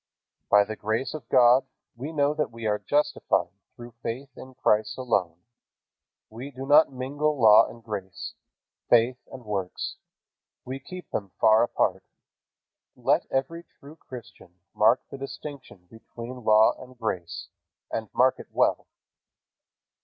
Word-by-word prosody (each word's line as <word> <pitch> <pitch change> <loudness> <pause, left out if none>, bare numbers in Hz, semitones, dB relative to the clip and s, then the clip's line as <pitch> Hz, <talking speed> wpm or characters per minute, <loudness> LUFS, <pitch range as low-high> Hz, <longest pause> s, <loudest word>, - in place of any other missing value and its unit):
By 105 0 +6
the 110 +2 -6
grace 110 +5 -2
of 155 - -8
God 125 +1 +5 0.3
we 135 +7 -6
know 145 -2 +2
that 150 -5 -1
we 115 0 -9
are 105 -1 +1
justified 150 +1 0 0.2
through 120 0 -10
faith 130 +3 -5
in 130 0 -12
Christ 110 -1 +1
alone. 100 -10 0 0.9
We 120 +6 -8
do 135 -1 -8
not 150 +2 +6
mingle 145 +3 -2
law 110 -1 +7
and 115 -1 -12
grace, 100 -4 -6 0.6
faith 120 +2 +4
and 130 -3 -10
works. 95 -3 -4 0.7
We 130 +2 -5
keep 180 +4 -10
them 100 -2 -3
far 110 0 +6
apart. 120 - 0 0.9
Let - - +1
every 150 +6 -2
true 150 -3 -16
Christian 120 - -12 0.2
mark 115 +4 +4
the 135 - -7
distinction 135 -8 -9
between 120 +2 -10
law 110 0 +5
and 130 0 -13
grace, 95 -7 -4 0.4
and 110 -2 -3
mark 130 +1 +3
it - - -10
well. - - +1
125 Hz, 140 wpm, -26 LUFS, 110-135 Hz, 0.9 s, law